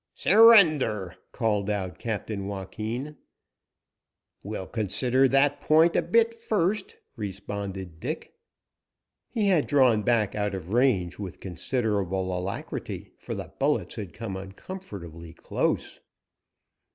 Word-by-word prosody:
"Surrender!" 155 - +5 0.2
called 105 -4 0
out 95 -3 -3
Captain 105 -3 -4
Joaquin. 110 +8 -5 1.2
"We'll 100 -2 -5
consider 125 +6 +2
that 135 +2 +2
point 160 +2 +4
a - - +4
bit 230 0 +2
first," 205 -2 0 0.2
responded 95 -4 -6
Dick. - - -5 1.0
He 210 -3 +1
had 170 -6 +3
drawn 130 -7 +4
back 110 -2 +1
out 105 -2 -1
of 90 -2 -7
range 115 -9 +2
with 95 -4 -7
considerable 95 -1 -2
alacrity, 90 +2 -5
for - - -5
the - - -7
bullets - - +1
had 100 -5 -6
come 110 -4 -6
uncomfortably 95 - -9
close. - - -2
105 Hz, 110 wpm, -27 LUFS, 95-140 Hz, 1.2 s, Surrender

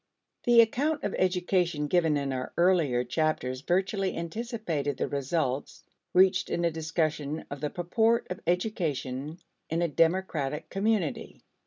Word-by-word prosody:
The 240 -1 +7
account 285 +7 0
of 205 - -2
education 180 -4 +1
given 160 -1 +2
in 140 -1 -2
our 130 -1 -4
earlier 170 -9 +3
chapters 130 -2 -1
virtually 190 +3 0
anticipated 170 - -3
the - - -1
results 140 -1 -2 0.3
reached 190 +1 +4
in 170 - 0
a 170 - +2
discussion 155 -1 -2
of 140 -1 -6
the 150 - -1
purport 220 +8 +1
of 180 - -4
education 160 - -1 0.3
in 165 +2 0
a - - +2
democratic 160 -3 0
community. 200 -5 -1
170 Hz, 135 wpm, -28 LUFS, 145-190 Hz, 0.3 s, The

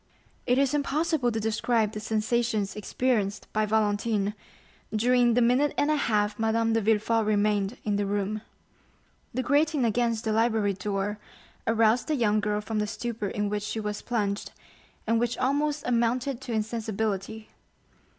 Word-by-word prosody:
50077m - - -35
It 250 0 +3
is 275 0 +2
impossible 295 -2 +1
to 225 - -2
describe 220 0 +1
the 215 - -5
sensations 220 -1 0
experienced 210 -1 -1
by 215 0 +1
Valentine 210 -1 +1 0.6
during 240 +2 +3
the 245 - +4
minute 255 +5 +2
and 290 - +2
a - - +3
half 210 -7 0
Madame 225 0 +1
de 225 - +2
Villefort 225 +1 +2
remained 210 0 +1
in 205 -1 0
the 205 -1 -1
room. 205 +1 -1 0.9
The 255 +2 -2
grating 290 +1 +2
against 230 0 +1
the 220 - -1
library 220 -2 +2
door 200 +2 -3 0.5
aroused 225 +1 +3
the 310 - +1
young 215 -5 +2
girl 210 0 -1
from 215 0 -3
the 210 - 0
stupor 225 -1 -4
in 205 +1 -2
which 205 0 -2
she 210 +2 -3
was 210 -1 -4
plunged, 205 -4 -2 0.5
and 230 +1 +2
which 240 0 -1
almost 290 +3 0
amounted 245 +2 0
to 265 - -6
insensibility. 220 -1 -2
220 Hz, 160 wpm, -27 LUFS, 210-240 Hz, 0.9 s, the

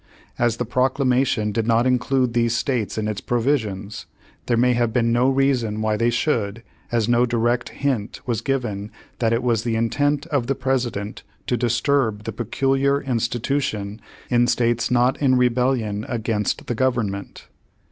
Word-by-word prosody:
As 120 -1 +2
the 125 - -2
Proclamation 130 -3 +1
did 110 +2 -1
not 115 +1 +3
include 125 0 +1
these 120 0 +1
states 120 -6 -1
in 110 -1 -1
its 105 -2 -3
provisions, 110 -6 -1 0.4
there 120 - +2
may 125 +1 +4
have 120 -1 +1
been 115 -1 +1
no 120 +3 +3
reason 130 -5 +1
why 110 0 +1
they 115 +2 +2
should, 115 -3 -1 0.3
as 115 -2 +1
no 120 +1 +3
direct 120 +1 0
hint 130 -7 -2
was 115 -3 -1
given 115 -7 -2 0.3
that 115 -2 +1
it 115 +1 +1
was 120 -3 +1
the 115 -1 -1
intent 145 +6 0
of 130 -5 +1
the 135 - 0
President 125 -5 -2 0.2
to 125 - 0
disturb 120 -2 +1
the 115 - -4
"peculiar 135 +5 +1
institution" 115 -4 -2 0.3
in 120 0 +4
states 120 -1 +1
not 125 +3 +2
in 130 -2 +4
rebellion 125 -4 +1
against 110 -3 -1
the - - -2
Government. 115 -5 -2
120 Hz, 155 wpm, -22 LUFS, 110-130 Hz, 0.4 s, may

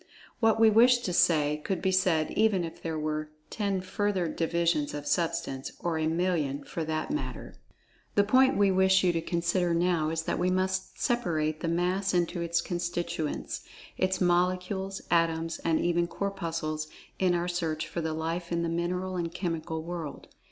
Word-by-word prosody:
What 225 -1 +3
we 225 -1 +7
wish 245 +3 +6
to 180 - -2
say, 150 -3 +3
could 190 -3 -1
be 190 +2 +1
said 180 -4 +2
even 210 -4 +2
if 165 - -7
there 160 -1 -3
were 155 0 -2 0.2
ten 200 -3 -1
further 190 -1 -1
divisions 165 -2 0
of 145 0 -5
Substance—or 165 0 -2
a 155 - +1
million, 160 -5 0
for 165 - -4
that 155 0 -2
matter. 300 - -4 0.6
The 205 - +5
point 260 +5 +4
we 200 -1 +4
wish 190 0 +4
you 180 -1 +3
to 165 - 0
consider 170 +1 0
now, 170 -2 +2
is 160 0 -2
that - - -2
we 180 +1 +2
must 185 +1 -1
separate 155 -10 0
the - - -3
Mass 180 +3 0
into 175 0 0
its 170 0 +1
constituents—its 175 +1 -3
Molecules, 185 +2 0
Atoms, 165 -1 +1
and 165 -1 +1
even 175 0 +1
Corpuscles—in 165 -1 -3
our 175 0 -1
search 165 -3 -2
for 170 - -4
the 160 -1 -2
Life 165 +2 -3
in 170 0 0
the 170 - -1
Mineral 180 +2 -2
and 170 -1 -2
Chemical 165 -3 -3
World. 165 -3 -6
175 Hz, 165 wpm, -29 LUFS, 160-185 Hz, 0.6 s, we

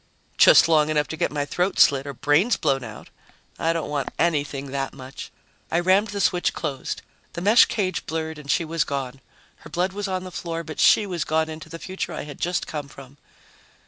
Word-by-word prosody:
"Just - - +8
long 155 -2 +3
enough 150 -1 +1
to - - -4
get 170 - -1
my 145 -1 -2
throat 180 +6 -1
slit 140 0 +4
or 140 - -5
brains 155 - +2
blown 135 -1 0
out. 110 -2 -10 0.5
I 165 - +1
don't 165 -1 -2
want 145 -2 -2
anything 145 -4 -1
that 135 -1 -3
much." 130 0 -9 0.4
I 170 - +1
rammed 190 +4 +3
the 205 -1 -5
switch 180 -2 +1
closed. 140 -5 -4 0.3
The 170 - -5
mesh 210 +6 +6
cage 185 -4 -2
blurred 160 -1 -4
and 145 -1 -12
she 165 - +2
was 165 0 0
gone. 135 -1 -5 0.4
Her - - -14
blood 180 +5 -1
was 205 0 -3
on 185 -1 -2
the 185 - -8
floor, 170 -1 -4
but 155 -1 -8
she 210 - +5
was 180 -5 -2
gone 160 0 0
into 155 0 -9
the 165 - -7
future 190 +3 -5
I - - -5
had 145 -1 -10
just 175 +1 -1
come 150 -2 -5
from. 140 0 -14
160 Hz, 210 wpm, -24 LUFS, 145-180 Hz, 0.5 s, Just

